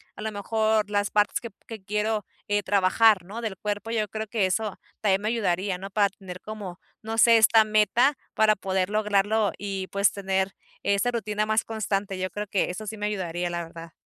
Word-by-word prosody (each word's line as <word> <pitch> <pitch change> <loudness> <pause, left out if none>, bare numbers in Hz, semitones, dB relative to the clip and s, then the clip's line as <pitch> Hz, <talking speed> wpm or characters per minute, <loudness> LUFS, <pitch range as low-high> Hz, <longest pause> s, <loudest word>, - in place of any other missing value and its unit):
a - - -9
lo 220 0 -3
mejor 215 0 0
las 205 0 +1
partes 210 -1 +2
que 235 - -6 0.2
que 220 -4 -8
quiero, 210 +1 -1 0.2
eh, 205 0 +2
trabajar, 200 +1 +4
¿no?, 215 +5 -7
del 215 -5 -4
cuerpo. 205 +2 -3
Yo 215 -2 0
creo 220 +2 -4
que 210 -2 +1
eso 210 +2 -2 0.2
también 195 -2 +2
me 210 - -1
ayudaría, 195 -4 0
¿no?, 195 +1 -7
para 205 0 +3
tener 185 -2 -10
como, 205 -4 -7 0.2
no 225 +1 -4
sé, 230 0 +7
esta 220 0 +6
meta 215 +6 +3 0.2
para 215 -1 +4
poder 190 -1 -1
lograrlo 210 0 +2
y 195 -2 -4
pues 200 0 +2
tener 190 -1 -1 0.3
esa 200 +4 +2
rutina 215 -2 -1
más 220 +1 +2
constante. 200 -3 -2
Yo 185 0 -2
creo 210 0 -4
que 195 -1 0
eso 215 +4 -7
sí 220 - -5
me 210 0 -2
ayudaría, 175 -4 -2
la 170 0 -2
verdad. 165 0 -10
205 Hz, 200 wpm, -26 LUFS, 190-220 Hz, 0.3 s, sé